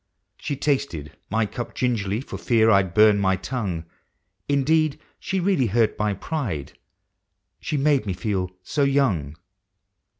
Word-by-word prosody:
She 145 - -3
tasted 130 - -2
my 110 +1 +1
cup 120 +3 -6
gingerly, 110 -4 0
for - - -8
fear 110 -2 +3
I'd 95 -4 +2
burn 105 -1 +6
my 95 -1 +2
tongue; 95 -4 -4 0.6
Indeed, 155 +2 +2 0.2
she 190 - -2
really 180 -9 +2
hurt 110 +1 +2
my 105 -1 +1
pride 100 - -4 0.5
— - - -54
she 150 - -2
made 140 -5 +2
me 95 - 0
feel 95 -2 -2
so 145 - -2
young. 125 - +1
110 Hz, 140 wpm, -24 LUFS, 95-140 Hz, 0.6 s, burn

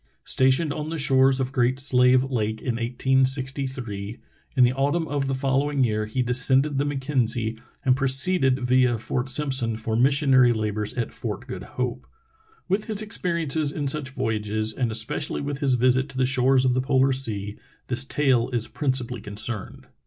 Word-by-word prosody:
Stationed 135 +4 +2
on 150 +1 -5
the 165 - -4
shores 135 -2 +3
of 130 0 -2
Great 130 0 0
Slave 125 -1 +4
Lake 110 -5 -2
in 120 -1 -3
1863, 130 -3 0 0.4
in 130 - +5
the 125 +1 +3
autumn 145 +5 -1
of 140 -2 -2
the 135 - -1
following 135 +1 0
year 110 -2 -1
he 125 +4 -2
descended 130 +3 +3
the 140 - 0
Mackenzie 125 -5 -2 0.3
and 130 -1 +4
proceeded 135 +1 +2
via 125 -1 +2
Fort 125 +3 -3
Simpson 130 -5 0
for 110 0 -3
mis 130 +4 +3
sionary 130 -4 +4
labors 105 -1 -3
at 120 -3 -3
Fort - - -5
Good - - -7 0.2
Hope. 125 0 -3 0.6
With 200 +3 -1
his 215 -2 -1
experi 175 -6 -2
ences 150 0 0
in 145 -1 -4
such 140 -1 -1
voyages, 110 -4 -2
and 120 -2 -2
especially 110 0 +1
with 145 -1 -4
his 135 -4 +2
visit 130 +3 +2
to 135 - -9
the 130 - +2
shores 130 0 +2
of 125 - +2
the 130 - 0
polar 135 0 +2
sea, 105 -6 -1 0.3
this 125 0 -1
tale 135 -3 +1
is 120 -3 -2
principally 130 -5 -2
con 105 -1 -9
cerned. 110 -1 -2
130 Hz, 175 wpm, -24 LUFS, 120-135 Hz, 0.6 s, in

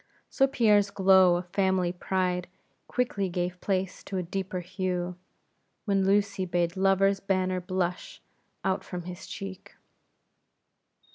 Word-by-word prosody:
So 270 - +4
Pierre's 210 -6 +3
glow 190 -2 +5
of 175 +1 -3
family 190 -2 +1
pride 180 -1 -1 0.4
quickly 205 -6 -1
gave 180 0 -3
place 190 -2 -2
to 195 - -4
a 180 - -1
deeper 185 +1 -3
hue, 180 -1 -3 0.7
when 195 -2 +2
Lucy 200 -1 +2
bade 175 -1 0
love's 195 +1 +3
banner 185 -2 0
blush 180 0 -3 0.5
out 190 0 0
from 180 -1 -6
his 180 +1 -8
cheek. 195 -1 -8
185 Hz, 125 wpm, -28 LUFS, 180-195 Hz, 0.7 s, glow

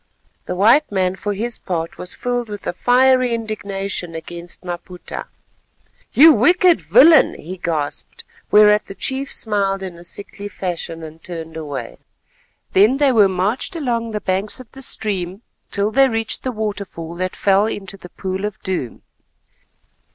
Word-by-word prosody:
The 180 - -2
white 230 +10 +4
man 185 -2 0
for 205 +2 -3
his 230 +4 -2
part 165 -3 -4
was 180 - -4
filled 245 -2 -2
with 205 -1 -7
a - - -2
fiery 250 +3 +3
indignation 200 -5 -4
against 170 +2 -7
Maputa. 180 0 -7 0.8
"You 315 +3 +8
wicked 355 - +4
villain," 255 - +6
he 185 +4 -8
gasped, 155 -5 -3 0.3
whereat 210 0 +6
the 195 - -9
chief 270 +5 -2
smiled 195 -3 0
in 180 -3 -7
a - - -12
sickly 200 +3 -7
fashion, 170 -4 -5
and 160 +1 -10
turned 165 -2 -7
away. 150 -4 -6 0.7
Then 215 +8 +5
they 285 -2 +4
were 215 -5 +5
marched 200 - -1
along 235 -7 -1
the 210 -1 -4
banks 195 +5 -2
of 255 - -13
the 270 - -11
stream 200 -4 -2 0.3
till 205 +1 0
they 270 +2 +5
reached 225 -1 -2
the 255 - -2
waterfall 200 -7 -5
that 185 +1 -2
fell 200 +1 +3
into 195 -3 -6
the 180 -2 -12
Pool 190 +1 -4
of 210 -2 -5
Doom. 175 -11 -4
200 Hz, 155 wpm, -20 LUFS, 180-230 Hz, 0.8 s, You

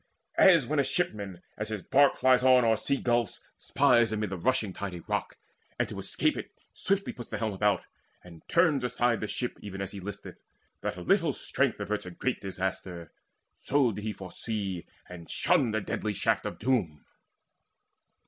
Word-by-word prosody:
As 170 -8 +7
when 150 +3 0
a - - +4
shipman, 100 - -2 0.2
as 105 - -3
his 105 -4 -4
bark 140 +1 +4
flies 130 -1 +4
on 130 -2 +6
O'er 115 -1 +4
sea 140 +5 -1
gulfs, 120 -5 0 0.2
spies 120 -5 +3
amid 105 -2 -2
the - - -2
rushing 105 +2 0
tide 100 -2 -5
A 85 - -7
rock, - - -3 0.4
and - - +1
to - - -6
escape - - 0
it - - -6 0.2
swiftly 195 0 -1
puts 120 - -9
The - - -3
helm 110 -2 -2
about, 105 +1 +1 0.4
and 85 -3 -13
turns 160 -6 +3
aside 120 -1 +1
the 110 - -2
ship 120 +5 -3
Even 95 -2 -7
as 95 -1 -4
he 100 - -7
listeth, 100 +1 -8 0.4
that - - -3
a - - -6
little 170 - +3
strength 140 -3 -1
Averts 105 -1 -3
a - - -4
great 120 +8 -2
disaster; 95 -3 -4 0.5
so 135 -4 +2
did 105 - -6
he 110 - -2
Foresee 95 -1 -4 0.2
and 85 -2 -10
shun 130 - +2
the 110 0 0
deadly 105 +1 -2
shaft - - 0
of - - -6
doom. 105 - 0
110 Hz, 185 wpm, -29 LUFS, 95-130 Hz, 0.5 s, As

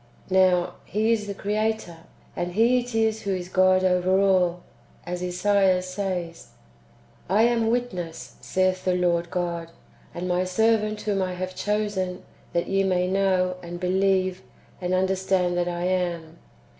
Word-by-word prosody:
Now 185 -2 +3
He 215 +2 0
is 215 -2 0
the 200 - -4
Creator, 215 -3 -2 0.4
and 175 0 -3
He 235 +5 +4
it 245 -1 -6
is 220 -1 +1
who 195 -1 -1
is 180 -1 -6
God 185 0 +4
over 185 +1 +3
all, 180 -3 +2 0.4
as 180 0 -4
Esaias 185 0 +2
says, 185 -3 -4 0.4
" 65 - -30 0.3
I 205 +4 +4
am 230 -1 +2
witness, 185 -9 -3
saith 185 0 0
the 185 -1 +1
Lord 175 -1 +1
God, 170 -2 -3 0.5
and 175 +1 -4
my 180 0 +1
servant 215 +2 +1
whom 205 -2 -1
I 185 -1 -2
have 185 +1 -4
chosen, 205 -3 -2 0.3
that 170 - 0
ye 195 0 +1
may 180 -1 +1
know, 185 -1 +1
and 175 0 -7
believe, 185 0 +1 0.4
and 180 +1 0
understand 190 -1 +1
that 175 0 0
I 175 0 -3
AM. 175 -3 -2
185 Hz, 155 wpm, -25 LUFS, 180-200 Hz, 0.5 s, He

